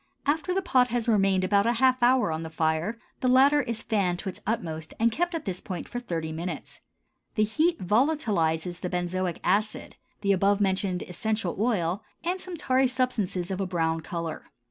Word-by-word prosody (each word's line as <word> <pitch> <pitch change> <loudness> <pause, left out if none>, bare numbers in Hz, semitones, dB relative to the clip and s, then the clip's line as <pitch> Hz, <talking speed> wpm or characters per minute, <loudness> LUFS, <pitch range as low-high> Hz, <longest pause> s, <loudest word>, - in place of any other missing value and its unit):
After 310 +5 0
the 385 +1 0
pot 255 -7 +4
has 240 -1 -1
remained 195 -4 +3
about 200 +3 +3
half 255 +2 +3
an 240 - +6
hour 255 -9 +2
on 160 0 -2
the 160 - -5
fire, 160 +6 0 0.2
the 255 - 0
latter 275 +3 +5
is 230 -3 -4
fanned 190 -5 +1
to 190 - -4
its 185 - -8
utmost 160 -8 -3
and 230 +1 +3
kept 345 +7 -1
at 325 - -4
this 185 -2 -3
point 185 -4 -5
for 245 - -4
thirty 165 -9 -4
minutes. 165 0 -6 0.6
The 215 - +3
heat 315 +10 +1
volatilizes 185 - +1
the 180 - -3
benzoic 180 0 -2
acid, 205 +4 0 0.2
the 200 - +2
above 200 +1 +3
mentioned 190 -2 0
essential 210 0 -2
oil, 200 -4 0 0.2
and 360 +2 -1
some 365 -2 -6
tarry 260 -3 +2
substances 220 -8 -1
of 190 +1 -2
a 190 - -1
brown 165 -2 0
color. 165 -3 -5
200 Hz, 190 wpm, -27 LUFS, 175-250 Hz, 0.6 s, an